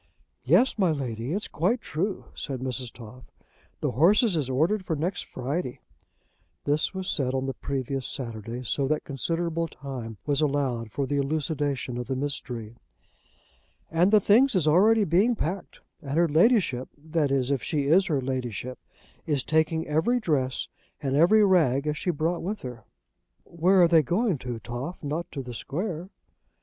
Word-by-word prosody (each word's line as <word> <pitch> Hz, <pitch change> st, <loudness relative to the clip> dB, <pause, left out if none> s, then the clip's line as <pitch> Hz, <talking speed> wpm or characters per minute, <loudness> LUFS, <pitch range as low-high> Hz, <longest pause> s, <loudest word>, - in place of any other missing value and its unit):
"Yes, 185 Hz, -, +3 dB
my 185 Hz, -3 st, +4 dB
Lady, 125 Hz, -4 st, -3 dB
it's 205 Hz, +5 st, -2 dB
quite 190 Hz, +11 st, 0 dB
true," 190 Hz, +1 st, -3 dB
said 135 Hz, -3 st, -4 dB
Mrs. 130 Hz, -1 st, -3 dB
Toff. 120 Hz, +1 st, -12 dB, 0.6 s
"The -, -, 0 dB
horses 200 Hz, -, +4 dB
is 145 Hz, -5 st, 0 dB
ordered 165 Hz, +10 st, +1 dB
for 165 Hz, -3 st, -2 dB
next 170 Hz, +6 st, -2 dB
Friday." 130 Hz, +2 st, -4 dB, 0.9 s
This 145 Hz, +2 st, +1 dB
was 190 Hz, -1 st, -4 dB
said 135 Hz, -8 st, 0 dB
on 130 Hz, 0 st, -1 dB
the 135 Hz, -, -2 dB
previous 135 Hz, 0 st, -3 dB
Saturday, 115 Hz, -1 st, -5 dB
so 135 Hz, +3 st, 0 dB
that 150 Hz, +1 st, 0 dB
considerable 165 Hz, +4 st, -2 dB
time 130 Hz, -7 st, -7 dB
was 145 Hz, 0 st, +1 dB
allowed 135 Hz, -6 st, 0 dB
for 140 Hz, -, -1 dB
the 145 Hz, +2 st, -1 dB
elucidation 140 Hz, -3 st, -1 dB
of 125 Hz, -, -5 dB
the 135 Hz, -, -1 dB
mystery. 120 Hz, -5 st, -4 dB, 1.1 s
"And 170 Hz, +3 st, +4 dB
the 215 Hz, 0 st, +6 dB
things 230 Hz, +6 st, +4 dB
is 170 Hz, -5 st, +2 dB
already 210 Hz, +8 st, +5 dB
being 200 Hz, +7 st, +3 dB
packed, 190 Hz, 0 st, -4 dB, 0.2 s
and 140 Hz, -1 st, -3 dB
her 170 Hz, 0 st, +4 dB
Ladyship, 160 Hz, -, +3 dB
that 155 Hz, 0 st, -1 dB
is, 135 Hz, -1 st, +1 dB
if 135 Hz, -4 st, 0 dB
she 150 Hz, +3 st, -1 dB
is 180 Hz, +6 st, +4 dB
her 150 Hz, -6 st, +1 dB
Ladyship, 125 Hz, -2 st, -4 dB, 0.5 s
is 145 Hz, -4 st, +1 dB
taking 160 Hz, +1 st, +1 dB
every 160 Hz, +12 st, +1 dB
dress 135 Hz, -, 0 dB, 0.3 s
and 135 Hz, -2 st, -1 dB
every 205 Hz, +8 st, +6 dB
rag 150 Hz, -8 st, +3 dB
as 150 Hz, 0 st, 0 dB
she 180 Hz, -, -3 dB
brought 165 Hz, +2 st, 0 dB
with 205 Hz, +4 st, -4 dB
her." 125 Hz, -4 st, -8 dB, 0.6 s
"Where 180 Hz, +2 st, +3 dB
are -, -, +7 dB
they 165 Hz, -1 st, +5 dB
going 180 Hz, -, 0 dB
to, 125 Hz, -2 st, -5 dB
Toff? 120 Hz, +10 st, -6 dB
Not 155 Hz, +4 st, -3 dB
to 140 Hz, -3 st, -5 dB
the 125 Hz, -1 st, -7 dB
Square?" 170 Hz, -, -4 dB
150 Hz, 165 wpm, -26 LUFS, 130-175 Hz, 1.1 s, are